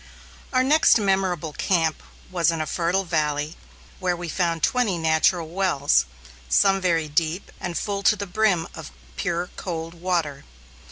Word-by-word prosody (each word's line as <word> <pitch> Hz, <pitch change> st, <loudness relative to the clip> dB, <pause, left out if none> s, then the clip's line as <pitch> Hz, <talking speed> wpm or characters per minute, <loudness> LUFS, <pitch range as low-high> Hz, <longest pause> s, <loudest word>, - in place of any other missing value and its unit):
Our 255 Hz, 0 st, +3 dB
next 300 Hz, +1 st, +5 dB
memorable 190 Hz, -6 st, 0 dB
camp 165 Hz, -3 st, 0 dB, 0.3 s
was 170 Hz, -3 st, +2 dB
in 165 Hz, -1 st, -1 dB
a 155 Hz, -, -1 dB
fertile 175 Hz, +4 st, 0 dB
valley 150 Hz, -2 st, -1 dB, 0.4 s
where 180 Hz, -2 st, 0 dB
we 175 Hz, -1 st, -6 dB
found 165 Hz, -2 st, -1 dB
twenty 240 Hz, -8 st, +2 dB
natural 160 Hz, +1 st, +2 dB
wells, 165 Hz, -, +2 dB, 0.4 s
some 195 Hz, -, +4 dB
very 165 Hz, -4 st, +1 dB
deep 160 Hz, +4 st, -1 dB
and 175 Hz, -2 st, -4 dB
full 200 Hz, -1 st, -2 dB
to 215 Hz, -, +3 dB
the 200 Hz, 0 st, -4 dB
brim 195 Hz, -3 st, +1 dB
of -, -, -8 dB, 0.3 s
pure, 170 Hz, -, -2 dB
cold 165 Hz, -2 st, -5 dB
water. 170 Hz, -5 st, -2 dB
175 Hz, 150 wpm, -24 LUFS, 160-190 Hz, 0.4 s, next